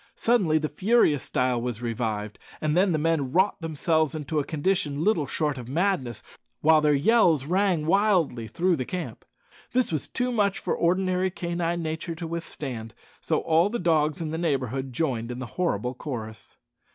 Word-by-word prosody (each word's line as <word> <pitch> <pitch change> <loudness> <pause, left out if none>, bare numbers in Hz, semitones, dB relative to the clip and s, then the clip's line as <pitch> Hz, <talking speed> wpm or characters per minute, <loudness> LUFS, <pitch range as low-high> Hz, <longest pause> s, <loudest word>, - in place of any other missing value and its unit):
Suddenly 200 -10 +2
the 155 0 -1
furious 185 - +2
style 125 -2 0
was 120 -2 -3
revived, 110 -3 -3 0.2
and 155 0 0
the 180 -2 +3
men 150 -4 0
wrought 190 +4 +2
themselves 160 -1 0
into 150 0 -2
a - - 0
condition 150 -1 -1
little 175 -8 +2
short 150 -4 -1
of 120 0 -9
madness, 145 - -1 0.4
while 155 0 +5
their 150 -1 +3
yells 160 - +4
rang 180 -1 +1
wildly 175 - +2
through 175 - +1
the 130 - -2
camp. 180 +7 -6 0.5
This 255 -5 +1
was 155 -4 -2
too 250 0 -1
much 205 -4 +1
for - - -2
ordinary 185 +1 +1
canine 170 -1 -2
nature 160 +1 -4
to 170 +1 -6
withstand, 140 -9 -6 0.3
so - - 0
all 165 +4 +3
the 240 - -2
dogs 155 -3 +1
in 155 -2 -3
the 160 - -3
neighbourhood 135 -5 -1
joined 125 -4 -2
in 125 - -5
the 130 - -5
horrible 125 - 0
chorus. 115 -6 -7
155 Hz, 170 wpm, -26 LUFS, 130-180 Hz, 0.5 s, while